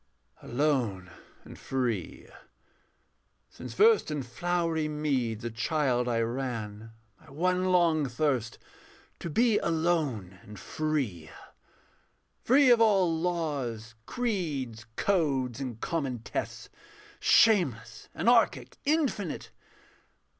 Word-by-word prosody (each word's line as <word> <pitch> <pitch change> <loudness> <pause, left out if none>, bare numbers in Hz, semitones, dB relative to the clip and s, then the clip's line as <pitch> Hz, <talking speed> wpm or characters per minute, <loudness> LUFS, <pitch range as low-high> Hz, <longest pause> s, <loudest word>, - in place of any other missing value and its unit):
Alone 120 - -1 0.3
and - - -12
free. 125 -4 -3 1.2
Since - - -9
first 445 - +4
in 150 -3 -3
flowery 165 +3 -1
meads 135 -7 -1
a 120 - -3
child 125 +1 0
I 115 -1 +1
ran, 115 -3 -4 0.3
My 160 - -19
one 180 +6 0
long 170 -5 +3
thirst 125 -3 -1 0.6
to 170 - -5
be 225 +6 +3
alone 155 - -1
and 105 0 -12
free. 130 - -3 1.1
Free 265 +1 +5
of 235 -1 +5
all 195 -7 +4
laws, 145 -10 -3
creeds, 150 - -3
codes, 140 - 0
and 125 -5 -5
common 135 -8 -3
tests, - - -5 0.5
Shameless, 120 - +3
anarchic, 235 -1 +2
infinite. 280 - -1
145 Hz, 95 wpm, -28 LUFS, 120-175 Hz, 1.2 s, Free